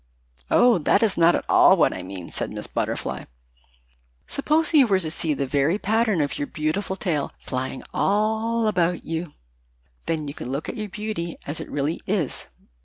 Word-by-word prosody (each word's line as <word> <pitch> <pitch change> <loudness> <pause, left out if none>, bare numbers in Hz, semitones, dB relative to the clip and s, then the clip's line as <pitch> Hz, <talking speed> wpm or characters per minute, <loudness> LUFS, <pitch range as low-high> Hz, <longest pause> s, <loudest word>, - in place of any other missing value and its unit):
"Oh, 240 -6 +5
that 195 +7 +3
is 215 -4 +2
not 170 +1 +5
at - - -2
all 190 - +6
what 165 - +3
I - - -5
mean," 90 -1 -8
said - - -3
Miss - - -5
Butterfly. - - -3 1.0
"Suppose 310 +3 0
you 280 -5 +7
were 195 -3 +3
to 160 -4 -4
see 155 -2 -1
the 140 - -1
very 145 +7 +1
pattern 215 -3 +1
of 145 - -2
your 145 - -2
beautiful 160 +6 -2
tail 170 -7 -2
flying 130 0 -4
all 220 +3 +1
about 180 -4 +1
you. 165 -1 -4 0.7
Then 155 -2 -1
you 140 - -5
could - - -7
look 140 +3 -3
at - - -4
your 215 -1 -4
beauty 205 -5 -4
as 145 +2 -4
it - - -7
really 145 +3 -2
is." 185 -8 -1
175 Hz, 180 wpm, -24 LUFS, 150-215 Hz, 1.0 s, you